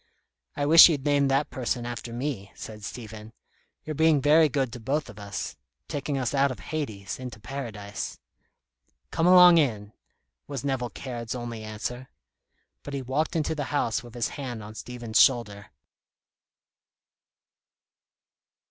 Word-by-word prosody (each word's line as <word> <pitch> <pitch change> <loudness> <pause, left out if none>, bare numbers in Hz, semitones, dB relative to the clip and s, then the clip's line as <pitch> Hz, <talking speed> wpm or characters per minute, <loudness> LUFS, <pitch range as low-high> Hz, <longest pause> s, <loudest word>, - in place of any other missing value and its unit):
"I 145 - -1
wish 160 +3 +10
you'd 145 -4 -1
name 145 -1 +3
that 135 +2 +1
person 125 -2 -2
after 120 -1 -6
me," 120 -5 -4
said 105 -1 -9
Stephen. 110 -1 -8 0.5
"You're 155 - -4
being 160 0 +4
very 150 +3 +5
good 130 -4 -1
to 120 - -7
both 140 +5 -2
of 105 - -14
us, 100 -1 -5 0.3
taking 145 0 -3
us 130 -1 -1
out 140 0 +3
of 130 - -5
Hades 110 -12 -5
into 125 -4 -7
Paradise." 105 -4 -6 0.9
"Come 165 - +1
along 180 -2 +8
in," 105 -8 -1 0.5
was 140 -4 -5
Nevill 130 -3 -1
Caird's 120 -3 -6
only 120 -2 -6
answer. 115 +4 -6 0.7
But 145 - -6
he 135 - -3
walked 140 +7 -1
into 160 -1 0
the 145 -3 -3
house 125 -6 0
with 120 -1 -13
his 120 - -1
hand 125 -6 -6
on 105 +1 -9
Stephen's 120 -1 -2
shoulder. 105 -6 +2
125 Hz, 145 wpm, -26 LUFS, 110-145 Hz, 0.9 s, wish